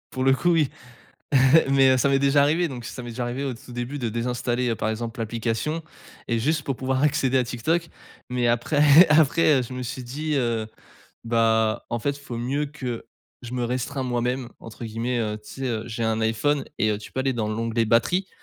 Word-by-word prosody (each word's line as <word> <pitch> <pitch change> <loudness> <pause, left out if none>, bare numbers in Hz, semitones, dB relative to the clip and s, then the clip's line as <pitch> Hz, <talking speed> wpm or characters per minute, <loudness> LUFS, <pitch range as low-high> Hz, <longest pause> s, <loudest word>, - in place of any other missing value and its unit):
pour 130 - -1
le 135 - +5
coup, 155 +7 +2
oui, 155 -5 +3 0.7
heu, 135 +3 +5
mais 135 -1 +5
heu, - - +2
ça 140 +2 +2
m'est 135 - +4
déjà 140 +1 +4
arrivé 165 +4 +2
donc 125 -5 -7
ça 125 - -7
m'est 120 - -7
déjà 120 +2 -4
arrivé 125 +3 -3
au 135 -2 -2
tout 120 - -13
début 120 +4 -4
de 120 -3 -1
désinstaller, 120 +1 -1
heu, 115 - 0
par 110 - -2
exemple 115 +1 -4
l'application 115 +8 -2 0.4
et 115 -1 0
juste 150 +5 0
pour 135 - -2
pouvoir 130 +1 -1
accéder 135 -3 +2
à 125 - +3
Tik 120 0 -7
Tok, 165 +1 +1 0.4
mais 125 -1 +1
après 145 +7 +5
après, 150 -1 +4
heu, - - -1
je 125 - -8
me 125 0 -4
suis 125 +1 -5
dit, 150 +5 -3
heu: 115 -4 0 0.6
«Bah 115 -1 +1
en 120 - -1
fait 140 +5 -2
faut 135 -5 -7
mieux 135 +5 -1
que 130 -5 -6 0.4
je 120 - -7
me 125 -1 -1
restreins 130 +3 -2
"moi-même"» 125 0 -1
entre 115 +1 -10
guillemets, 115 +2 -2
heu, 105 -2 -2
tu 105 - -18
sais, 135 - -1
heu, 110 -3 -2
j'ai 115 0 -4
un 110 0 0
IPhone 115 +6 +1
et 110 - +3
heu, 105 - -1
tu 105 - -11
peux - - -3
aller 135 0 0
dans 110 -3 -2
l'onglet 115 +1 0
batterie 145 - +2
125 Hz, 225 wpm, -24 LUFS, 115-140 Hz, 0.7 s, le